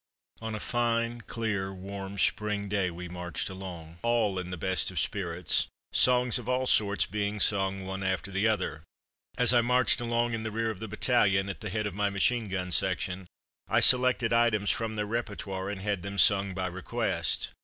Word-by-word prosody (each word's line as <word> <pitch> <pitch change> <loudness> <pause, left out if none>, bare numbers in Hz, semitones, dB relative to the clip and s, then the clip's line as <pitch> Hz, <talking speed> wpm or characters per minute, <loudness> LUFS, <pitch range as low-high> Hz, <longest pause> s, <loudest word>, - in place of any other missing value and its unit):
On 110 -1 -4
a - - -4
fine, 120 +1 -1
clear, 105 -4 -2
warm 95 +1 -7
spring 105 0 0
day 100 -2 0
we 90 +1 -7
marched 90 0 -5
along, 85 -3 -9
all 115 -5 +1
in 90 -1 -6
the 90 - -5
best 95 +2 +1
of - - -3
spirits, - - 0 0.3
songs 125 0 +4
of 120 0 -7
all 130 +1 +1
sorts 100 -5 +2
being 105 0 -3
sung 95 -1 +1
one 95 0 -5
after 95 +1 -2
the 100 +3 +1
other. 95 -7 -1 0.6
As 125 -1 +6
I 120 - +5
marched 125 -1 +4
along 120 0 0
in 115 - -2
the 110 - -3
rear 115 +1 -1
of 105 - -9
the 110 - -5
battalion, 100 -3 +2
at 100 - -6
the 105 - -4
head 105 +2 -2
of 105 - -3
my 105 +1 0
machine 105 +3 +1
gun 90 -1 -3
section, 90 +2 0 0.4
I - - +3
selected 125 -2 +5
items 115 -3 +3
from 110 0 -3
their 105 -1 -1
repertoire 100 -4 -4
and 100 -2 -5
had 100 -2 -1
them 100 +2 -6
sung 100 -1 +4
"by 95 -1 -2
request." 90 +1 -2
100 Hz, 190 wpm, -29 LUFS, 95-115 Hz, 0.6 s, As